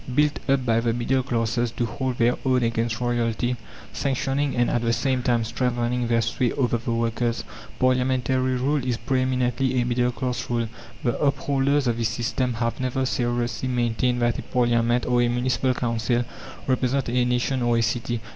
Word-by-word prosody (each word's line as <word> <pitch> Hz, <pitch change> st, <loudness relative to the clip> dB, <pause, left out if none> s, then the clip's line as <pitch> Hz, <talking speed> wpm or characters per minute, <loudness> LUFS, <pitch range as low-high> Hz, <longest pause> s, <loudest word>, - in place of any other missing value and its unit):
Built 150 Hz, +1 st, +2 dB
up 135 Hz, -2 st, +2 dB
by 115 Hz, -1 st, +3 dB
the 115 Hz, 0 st, 0 dB
middle 120 Hz, +3 st, +1 dB
classes 120 Hz, -1 st, 0 dB
to 120 Hz, -, -1 dB
hold 130 Hz, +1 st, -3 dB
their 120 Hz, +1 st, +3 dB
own 130 Hz, -2 st, +2 dB
against 115 Hz, -1 st, 0 dB
royalty, 120 Hz, 0 st, 0 dB, 0.4 s
sanctioning, 135 Hz, +1 st, -1 dB
and, 120 Hz, 0 st, +2 dB
at 120 Hz, -, 0 dB
the 115 Hz, 0 st, +1 dB
same 130 Hz, 0 st, 0 dB
time 120 Hz, -2 st, +1 dB
strengthening, 120 Hz, +1 st, -1 dB
their 115 Hz, -1 st, +2 dB
sway 120 Hz, +2 st, 0 dB
over 120 Hz, -3 st, +1 dB
the 115 Hz, -, -3 dB
workers, 115 Hz, 0 st, 0 dB, 0.3 s
parliamentary 130 Hz, 0 st, +1 dB
rule 135 Hz, +2 st, 0 dB
is 125 Hz, -2 st, -1 dB
pre 130 Hz, +3 st, 0 dB
eminently 130 Hz, 0 st, +1 dB
a 120 Hz, -, +1 dB
middle 125 Hz, 0 st, +1 dB
class 125 Hz, 0 st, -3 dB
rule. 120 Hz, -1 st, 0 dB, 0.4 s
The 120 Hz, -, 0 dB
upholders 140 Hz, 0 st, +1 dB
of 120 Hz, -2 st, +1 dB
this 115 Hz, -2 st, +1 dB
system 120 Hz, +1 st, -1 dB
have 115 Hz, 0 st, -2 dB
never 130 Hz, +1 st, -1 dB
seriously 120 Hz, 0 st, -1 dB
maintained 120 Hz, 0 st, +1 dB
that 120 Hz, 0 st, +1 dB
a -, -, -3 dB
parliament 120 Hz, -1 st, +1 dB
or 125 Hz, -1 st, +2 dB
a 120 Hz, -, +3 dB
municipal 125 Hz, +1 st, +1 dB
council 120 Hz, 0 st, 0 dB, 0.4 s
represent 130 Hz, +1 st, +1 dB
a 125 Hz, +1 st, +2 dB
nation 125 Hz, +2 st, 0 dB
or 120 Hz, -1 st, +2 dB
a 115 Hz, -, +2 dB
city. 120 Hz, +1 st, -1 dB
120 Hz, 180 wpm, -24 LUFS, 120-130 Hz, 0.4 s, by